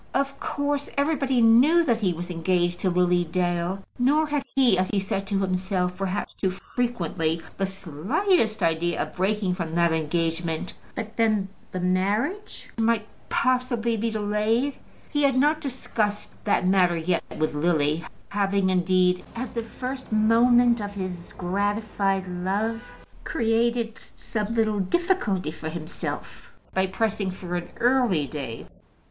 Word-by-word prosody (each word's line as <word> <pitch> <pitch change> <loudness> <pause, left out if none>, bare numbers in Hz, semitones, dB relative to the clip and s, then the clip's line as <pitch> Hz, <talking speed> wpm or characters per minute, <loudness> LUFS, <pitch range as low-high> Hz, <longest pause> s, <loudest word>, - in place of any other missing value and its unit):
Of 275 0 0
course, 285 0 -2
everybody 275 -4 +2
knew 265 +10 +6
that 235 -7 +1
he 190 -3 +2
was 175 +1 -5
engaged 175 +1 0
to 190 - +1
Lily 180 0 +3
Dale; 175 +2 -1 0.2
nor 290 +5 +4
had 295 -1 -1
he, 255 -7 +5
as 185 0 0
he 205 - +1
said 195 0 -2
to 195 -1 0
himself, 185 -1 0
perhaps 195 +1 -3
too 190 - -1
frequently, 180 -6 -2 0.2
the 195 - +1
slightest 200 - 0
idea 165 +1 +1
of - - -2
breaking 195 0 0
from 170 -3 -4
that 170 -1 +3
engagement. 165 +1 -1 0.2
But 220 -1 -6
then 215 -4 +2 0.2
the 185 - -3
marriage 205 - -1
might 225 -1 +2 0.2
possibly 250 -2 +1
be 225 +1 -1
delayed. 220 +5 0 0.3
He 290 - +1
had 275 -2 +3
not 300 +3 +3
discussed 225 -6 -2
that 205 - +2
matter 180 -2 +4
yet 165 +1 0
with 155 0 0
Lily, 155 0 +1 0.3
having, 200 -1 +1
indeed, 180 0 +2
at 235 0 -4
the 235 - -1
first 255 +3 -6
moment 235 +2 +4
of 205 0 -5
his 185 -3 -5
gratified 195 0 0
love, 205 +7 -2 0.3
created 230 -3 0 0.2
some 215 0 -3
little 215 -2 +2
difficulty 205 - 0
for 160 0 -6
himself 160 -1 -6 0.2
by 190 0 +2
pressing 205 0 -1
for 180 -1 -5
an 175 -1 -3
early 240 - +3
day. 135 -5 -6
200 Hz, 140 wpm, -25 LUFS, 180-235 Hz, 0.3 s, knew